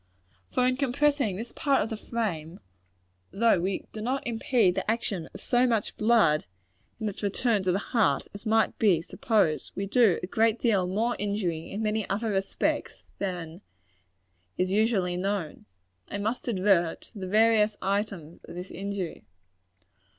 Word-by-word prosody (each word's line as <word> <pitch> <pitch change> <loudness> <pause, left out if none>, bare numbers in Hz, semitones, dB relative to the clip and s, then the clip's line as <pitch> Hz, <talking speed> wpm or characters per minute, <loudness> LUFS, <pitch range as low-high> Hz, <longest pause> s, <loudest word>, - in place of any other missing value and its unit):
For 250 - +1
in 255 0 +2
compressing 275 -4 +1
this 230 +5 -6
part 280 -6 +1
of 220 - -6
the - - -1
frame, 185 -8 -4 0.7
though 225 -2 +3
we 190 +2 -2
do 215 - -6
not 255 +5 -2
impede 230 -4 +2
the 190 +2 -3
action 205 -7 -2
of - - -9
so 250 0 +3
much 225 -3 0
blood 215 -9 +3 0.5
in 220 - -2
its 200 - -5
return 210 +1 +1
to 185 -1 +1
the 180 - +1
heart 215 +1 +1
as 200 - -9
might 220 0 +2
be 185 -7 +3
supposed, 170 -6 0
we 195 - -2
do 210 -3 +4
a - - 0
great 225 +4 +2
deal 205 -8 +2
more 225 +6 0
injury 185 -6 -2
in 210 +3 -4
many 215 -1 -1
other 215 +2 -1
respects 195 0 -1 0.2
than 175 -2 -4 1.0
is 185 0 0
usually 200 -4 +2
known. 185 - -3 0.4
I - - -3
must 220 +6 -2
advert 185 -5 +2
to 215 - -12
the 185 - -4
various 215 +1 +4
items 195 -5 -2
of 170 - -10
this 180 +1 -7
injury. 195 -2 -4
205 Hz, 160 wpm, -27 LUFS, 185-225 Hz, 1.0 s, do